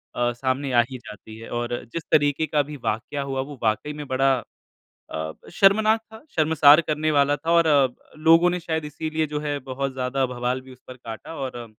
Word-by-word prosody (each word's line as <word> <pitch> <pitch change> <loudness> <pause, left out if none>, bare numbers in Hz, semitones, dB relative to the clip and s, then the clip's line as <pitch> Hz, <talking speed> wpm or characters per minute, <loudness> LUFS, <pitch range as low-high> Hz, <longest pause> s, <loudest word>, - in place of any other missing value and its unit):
अ, 120 0 +1
सामने 130 +2 -2
आ 120 - +6
ही 130 - -6
जाती 110 +1 -11
है। 115 - -10
और 120 0 -2 0.2
जिस 165 - -3
तरीके 145 +1 +3
का 150 -1 +2
भी 150 +1 -8
वाक्या 120 +6 -2
हुआ, 135 -1 -2
वो 140 -1 -8
वाक़ई 115 +7 0
में 150 -1 -7
बड़ा 135 +1 +2 0.8
अ, 80 0 -4 0.2
शर्मनाक 215 +3 +4
था, 220 0 -12
शर्मसार 155 0 +6
करने 155 +1 0
वाला 145 -1 +3
था 160 +4 -3
और 170 -1 +4 0.6
लोगों 165 +2 +7
ने 180 0 -2
शायद 160 -2 -3
इसीलिए 155 +1 -2
जो 150 - 0
है 145 -1 -2
बहुत 135 +1 -2
ज़्यादा 130 +1 -1
बवाल 125 +1 -1
भी 130 0 -15
उस 125 - -20
पर 130 - -10
काटा 115 +6 -9
और 125 -4 -5
140 Hz, 200 wpm, -24 LUFS, 125-155 Hz, 0.8 s, लोगों